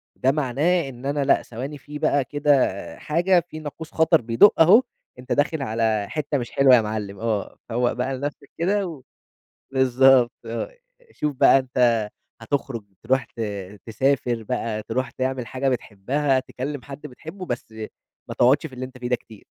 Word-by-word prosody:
ده 130 +1 +2
معناه 150 +3 +1
إن 125 +1 -11
أنا 140 0 0
لأ، - - +4
ثواني 135 +6 -6
في 150 +2 -9
بقى 140 -3 +2
كده 135 - +1
حاجة، 175 +3 +2
في 155 - -7
ناقوس 155 +2 -8
خطر 160 -1 +3
بيدُق 115 - +5
أهو، 210 +10 +7 0.4
أنت 125 +1 -10
داخل 145 +1 +1
على 110 -4 0
حِتّة 150 -2 -2
مش 120 -2 -5
حلوة 135 -2 +6
يا 115 - +4
معلم، 105 -2 -4
آه، 110 -3 -2
فوّق 120 +1 +1
بقى 130 +2 -2
لنفْسك 140 0 -6
كده 195 +3 +1
و 150 -6 -9 0.7
بالضبط 130 -1 +5
آه، 115 - -5 0.4
شوف 150 -3 -3
بقى 135 - +6
أنت 120 -4 +1 0.3
هتخرُج 115 -2 -3 0.2
ترُوح 130 +2 +1
ت 115 - -12 0.5
تسافر 120 0 0
بقى، 110 -2 -3
ترُوح 125 +3 -2
تعمل 130 -2 -3
حاجة 130 +4 -2
بتحبها، 130 +4 0
تكلِّم 135 +1 -6
حد 140 +2 -10
بتحبه، 165 +8 -9
بس 120 -2 -5 0.6
ما - - -5
تقعُدش 135 +6 +3
في 135 - -12
اللي 130 +1 -5
أنت 130 0 -10
فيه 125 0 -4
ده 125 - +2
كتير. 110 -2 -17
130 Hz, 170 wpm, -23 LUFS, 120-145 Hz, 0.7 s, أهو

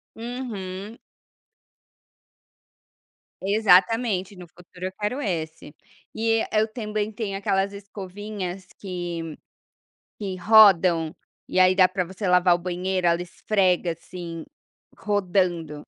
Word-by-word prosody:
Uhum. 225 -4 -6 2.5
Exatamente, 200 0 +3
no 180 -1 -11
futuro 180 +2 -11
eu - - -6
quero 245 +7 -2
esse. 160 - -4 0.4
E 225 0 +1
e - - -1
eu 220 +1 +2
também 215 -2 -3
tenho 205 -3 -4
aquelas 195 0 0
escovinhas 195 -1 -7
que 175 -4 -5 0.8
que 195 -3 -4
rodam, 180 -6 +5 0.3
e 185 - +1
aí 185 0 +6
dá 185 -1 +5
para 185 0 -1
você 190 +2 -5
lavar 180 0 +5
o 175 - +2
banheiro, 180 0 -1
ela 170 +1 +2
esfrega 180 -1 0
assim, 170 0 -8 0.5
rodando. 180 -6 0
185 Hz, 110 wpm, -24 LUFS, 180-210 Hz, 2.5 s, aí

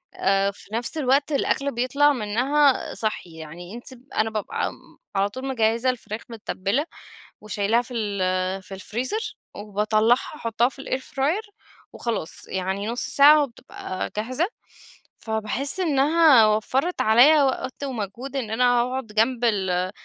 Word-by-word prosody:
آآ 195 +1 +2
في 200 +1 -15
نفس 240 +7 -3
الوقت 280 +1 +2
الأكل 280 0 0
بيطلع 280 +5 +2
منّها 260 +5 +1
صحّي، 200 -6 -4
يعني 165 +4 -9
أنتِ 240 - -9 0.3
أنا 220 +1 +2
بابقى 215 -2 -2
امم، - - -17 0.2
على 195 +1 +2
طول 260 +6 -7
مِجهزة 230 0 +1
الفراخ 230 -3 -4
مِتبلة 225 +3 -2 0.6
وشيلاها 215 +2 +1
في 245 +1 -11
ال 190 -3 -1
في 195 - -11
الفريزر 260 - -3 0.2
وباطلعها 215 +3 +2 0.2
أحطها 235 -2 0
في 270 0 -11
الair 260 - -2
fryer 345 +11 -2 0.4
وخلاص، 225 -9 -4
يعني 190 +2 -3
نص 235 +2 -2
ساعة 295 +1 +6
وبتبقى 230 -6 -6
جاهزة، 255 +10 0 0.7
فباحس 220 - -1
إنّها 295 -5 +5
وفرت 255 +11 0
عليَّ 270 +7 +6
وقت 260 +1 -2
ومجهود 250 +1 -5
إن 225 -5 -3
أنا 245 +1 +3
أقعد 255 0 -3
جنب 230 +3 +1
ال 185 -4 0
235 Hz, 135 wpm, -24 LUFS, 210-270 Hz, 0.7 s, ساعة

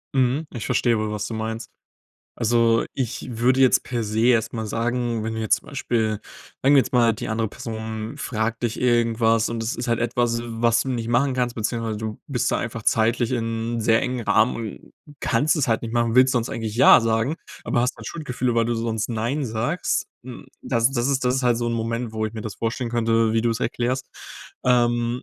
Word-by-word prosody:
Hm. 135 +4 +1
Ich 120 - -5
verstehe 120 -2 +2
wohl, 110 0 -2
was 105 -1 -3
du 115 - -5
meinst. 110 +1 -4 0.7
Also 115 0 +3
ich 130 -2 -4
würde 130 +3 +3
jetzt 130 - +5
per 120 -2 -2
se 105 +1 -2
erst 115 -3 +3
mal 110 -2 -4
sagen, 115 0 -1
wenn 110 - -3
du - - -3
jetzt 110 - +2
zum - - -15
Beispiel 110 -6 -1 0.4
sagen 140 +2 +5
wir - - +8
jetzt - - -6
mal, 120 -3 +4
die 120 +2 -6
andere 110 0 0
Person 110 +1 -6
fragt 110 0 -2
dich 120 +1 -2
irgendwas, 115 -2 +2
und 115 -1 -3
das 115 - -1
ist 120 - -4
halt 115 -1 +1
etwas, 120 0 0
was 115 0 +1
du 135 - -4
nicht 115 -3 -2
machen 130 +3 +2
kannst 125 -1 -1
beziehungsweise 115 0 -2
du 110 0 -5
bist 130 -6 -1
da - - +2
einfach 115 -1 -5
zeitlich 115 +3 +2
in 115 -1 -2
sehr 110 0 +3
engem 125 -2 -3
Rahmen 110 +3 +3
und 110 -3 -7 0.3
kannst 140 +7 +2
es 150 -6 0
halt 115 - +1
nicht 115 0 -5
machen, 115 0 +1
willst 130 +1 +6
sonst 120 -2 0
eigentlich 110 -2 -4
ja 125 - +8
sagen, 115 +5 0 0.3
aber 120 - 0
hast 125 +1 0
halt - - -11
Schuldgefühle, 130 -6 -2
weil 115 -1 +3
du 120 - 0
sonst 115 -1 -2
nein 120 +5 -2
sagst. 115 +10 -1 0.2
Hm, 125 -2 -10
das 115 0 +1
das 125 -1 0
ist 135 -2 +1
das 125 +1 +2
ist 135 - -1
halt 120 -1 +3
so 120 - -2
'n 120 - -1
Moment, 115 +1 -2
wo 110 0 -2
ich 110 - -5
mir 110 - -5
das 110 -1 -6
vorstellen 115 +2 -2
könnte, 115 -1 +2
wie 115 - +2
du 115 0 +1
es 115 - -3
erklärst. 125 +2 -1 0.6
Ähm. 120 0 +2
115 Hz, 220 wpm, -23 LUFS, 115-125 Hz, 0.7 s, wir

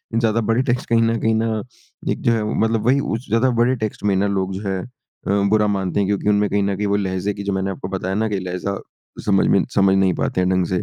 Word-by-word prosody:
ज़्यादा 115 0 +2
बड़े 115 +3 +2
टेक्स्ट 125 -1 -1
कहीं 115 -1 +4
न 115 0 +2
कहीं 110 - +1
न 110 -1 0 0.5
एक - - -3
जो 120 - +2
है 110 -2 +1 0.2
मतलब 110 0 +1
वही 135 +2 +4
उस 120 -3 -3
ज़्यादा 115 +4 +3
बड़े 125 +2 +3
टेक्स्ट 110 -4 -4
में 100 -2 +2
ना 100 +2 +2
लोग 95 -1 -1
जो 95 - -5
है 95 -1 -1
अ, - - -9 0.6
बुरा 105 0 +3
मानते 95 -1 -1
हैं 100 - +1
क्योंकि 105 0 0
उनमें 105 0 +2
कहीं 100 0 +1
न 100 0 0
कहीं 105 +1 -2
वो 100 - +1
लहज़े 95 0 -1
की 100 0 -7
जो 100 - -1
मैंने 95 0 -1
आपको 90 -1 -6
बताया 95 +1 -3
ना 110 +1 0
कि 100 - -1
लहज़ा 90 +2 -3 0.5
समझ 100 -2 +3
में 100 - +4
समझ 95 -1 +4
नहीं 95 -1 +3
पाते 90 - -1
हैं 90 - +1
ढंग 90 -1 +2
से। 90 +1 -1
100 Hz, 265 wpm, -20 LUFS, 95-110 Hz, 0.6 s, कहीं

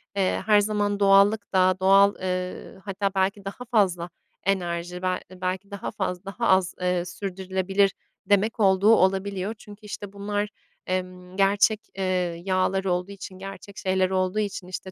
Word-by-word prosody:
eee, 190 -2 +1
her 210 -1 +6
zaman 205 -1 0
doğallık 200 +1 +4
da, 185 0 +4
doğal 195 +1 +5
eee, 185 0 -4
hatta 200 0 -1
belki 195 +1 0
daha 200 +6 -6
fazla 180 -6 +2 0.3
enerji, 180 -2 -1
bel 185 0 0
belki 185 +2 -4
daha 200 -1 -5
fazla 190 -3 -3
daha 230 +5 -2
az 190 -1 +3 0.3
sürdürülebilir 190 +1 0 0.3
demek 205 +4 +2
olduğu 200 +2 +5
olabiliyor. 195 +1 +1
Çünkü 210 0 -14
işte 205 -1 -7
bunlar, 205 +1 -2 0.4
emm, 185 0 -4
gerçek, 205 +2 +3 0.2
eee, 195 - -1 0.4
yağlar 190 0 +1
olduğu 180 +1 -1
için, 190 -1 -9
gerçek 195 +1 -9
şeyler 185 0 +1
olduğu 185 +2 0
için, 200 -3 -3
işte, 185 +1 -6
195 Hz, 145 wpm, -25 LUFS, 185-205 Hz, 0.4 s, her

